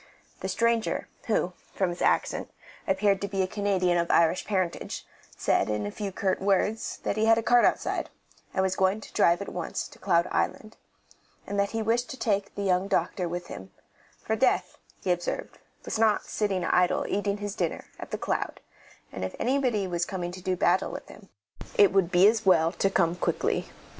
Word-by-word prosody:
The - - -4
stranger, 230 -1 0 0.2
who, 195 -5 +1 0.2
from 190 -3 +1
his 175 - -7
accent, - - +1 0.4
appeared 195 0 +2
to 200 - -1
be 195 -1 0
a - - -1
Canadian 185 -3 +1
of 170 - -1
Irish 170 +1 +3
parentage, 185 -5 -2 0.3
said, - - +1
in 105 -1 -1
a 105 - -3
few 200 - -4
curt 190 0 -1
words, 200 +3 0
that 200 - -1
he 215 - +2
had 225 0 +5
a 230 - 0
cart 245 +1 +5
outside, - - 0 0.4
and 190 - 0
was 190 0 0
going 190 +3 +2
to - - -12
drive 170 +3 +3
at - - -8
once 175 -2 -3
to - - -16
Cloud 175 -2 +2
Island, 215 0 -2 0.7
that 200 0 0
he 225 0 -2
wished 235 +3 +1
to 265 - -6
take 200 -5 -1
the 200 - -3
young 185 0 +2
doctor 180 -2 0
with 175 +1 -4
him; 95 - -9 0.5
for - - 0
death, - - +1 0.2
he 185 - +1
observed, 175 0 -3 0.3
was - - -3
not 220 -2 +3
sitting 195 -4 -1
idle 180 +1 +2
eating 200 0 -1
his 205 -1 -4
dinner 175 -5 -2
at - - -7
The - - -3
Cloud, - - -2 0.5
and 95 - -5
if 95 - -4
anyone 240 -7 0
was 170 0 0
coming 175 -2 -4
to 185 +1 -9
do 185 0 0
battle 180 +1 +2
with - - -8
him 200 -2 -14 0.5
it 200 -2 +6
would 190 -3 +3
be 185 +1 +6
as 220 0 +2
well 165 -4 +4
to 195 - +1
come 170 -3 +2
quickly. - - -1
190 Hz, 195 wpm, -27 LUFS, 180-205 Hz, 0.7 s, it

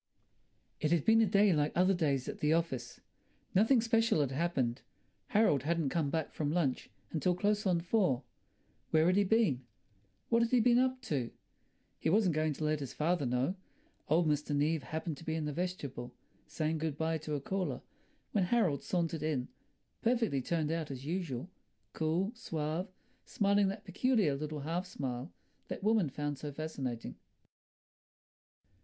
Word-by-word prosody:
It 155 - +1
had 170 -3 +2
been 225 0 +6
a 220 - +4
day 200 0 +4
like 150 -1 +1
other 185 +2 +4
days 140 -7 0
at - - -5
the 150 +1 +3
office. 135 -8 -2 0.5
Nothing 225 +6 +5
special 225 -7 +3
had 140 -2 0
happened. 135 -5 0 0.5
Harold 205 - +3
hadn't 160 0 0
come 155 -1 0
back 160 +1 -2
from 150 -2 -1
lunch 155 -6 0 0.2
until 175 +3 +1
close 205 +2 +1
on 175 -2 +2
four. 170 - +1 0.7
Where 160 0 +4
had 180 +2 +4
he 205 - +4
been? 195 - +2 0.7
What 230 0 +4
had 230 - +2
he 250 - +4
been 240 +1 +5
up 255 0 +1
to? 130 - -1 0.7
He - - 0
wasn't 195 -1 +3
going 155 0 +1
to 155 - -6
let 155 0 +1
his 140 -3 -6
father 155 -2 +1
know. 125 +7 +1 0.6
Old 165 +2 +3
Mr. 150 0 0
Neave 150 +2 +1
had 130 - -14
happened 160 -1 -3
to - - -11
be 160 0 -2
in 160 -1 -2
the 150 - -3
vestibule, 145 -8 -4 0.3
saying 155 0 -1
good 155 -2 -2
bye 160 +1 0
to 155 0 -3
a - - -1
caller, 190 +6 -3 0.5
when 195 -4 +2
Harold 180 - +2
sauntered 165 -3 -1
in, 150 -5 -1 0.5
perfectly 230 - +1
turned 160 +2 -1
out 165 -2 -2
as 135 -1 -7
usual, 165 -5 -3 0.5
cool, 165 +6 0
suave, 165 - -3 0.3
smiling 200 -1 +2
that 200 +2 -4
peculiar 205 - +2
little 150 +1 -4
half 170 +5 -2
smile 130 -3 -4 0.4
that - - -6
women 215 -7 +3
found 145 0 -3
so 145 +1 -5
fascinating. 135 -6 -5
160 Hz, 170 wpm, -33 LUFS, 145-190 Hz, 0.7 s, been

